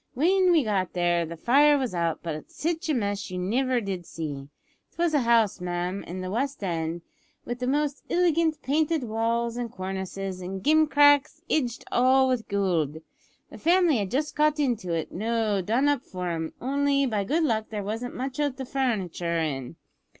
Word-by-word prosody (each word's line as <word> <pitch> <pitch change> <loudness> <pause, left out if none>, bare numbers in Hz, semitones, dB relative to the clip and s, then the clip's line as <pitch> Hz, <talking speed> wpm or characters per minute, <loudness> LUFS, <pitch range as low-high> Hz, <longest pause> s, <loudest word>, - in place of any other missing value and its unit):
W'en 365 +6 +3
we 325 -4 +4
got 195 -5 -1
there 175 -1 +1
the 170 +1 -7
fire 285 - +5
was 260 -7 -2
out, 170 -2 -1
but 155 -2 -5
sitch 330 +1 -3
a - - +3
mess 205 -3 -2
you 185 - -5
niver 245 +7 +1
did 195 -5 -4
see. 145 -4 -6 0.4
It - - -33
was 340 -1 +1
a 295 - +4
house, 230 -6 +2
ma'am, 180 +2 -2
in 185 +2 -6
the 185 0 -4
West 270 +2 -2
End, 165 -2 -2 0.4
with 240 +1 -4
the 250 - -2
most 290 +1 0
illigant 335 -2 +2
painted 310 +1 +1
walls 230 +1 -1
and 240 -2 -4
cornices 190 0 -5
and 190 +1 -6
gimcracks, 300 0 +4
idged 250 -6 0
all 260 +2 +4
with 250 -3 -1
goold. 175 -7 0 0.5
The - - -10
family 345 -4 +4
had 200 -3 -2
just 295 +7 -1
got 300 0 +2
into 235 -11 0
it 165 -1 -2
noo 220 0 0
done 235 +9 +1
up 290 -4 +2
for 180 -5 -5
'em, 160 -1 -3
only, 280 +1 +1
by 215 -5 0
good 310 +11 +1
luck, 220 -7 0
there 210 -2 -4
wasn't 225 +5 -4
much 260 +2 -4
o' 295 -1 +2
the 265 0 -7
furnitur' 195 -11 -1
in. 140 -4 -3
230 Hz, 185 wpm, -26 LUFS, 185-285 Hz, 0.5 s, fire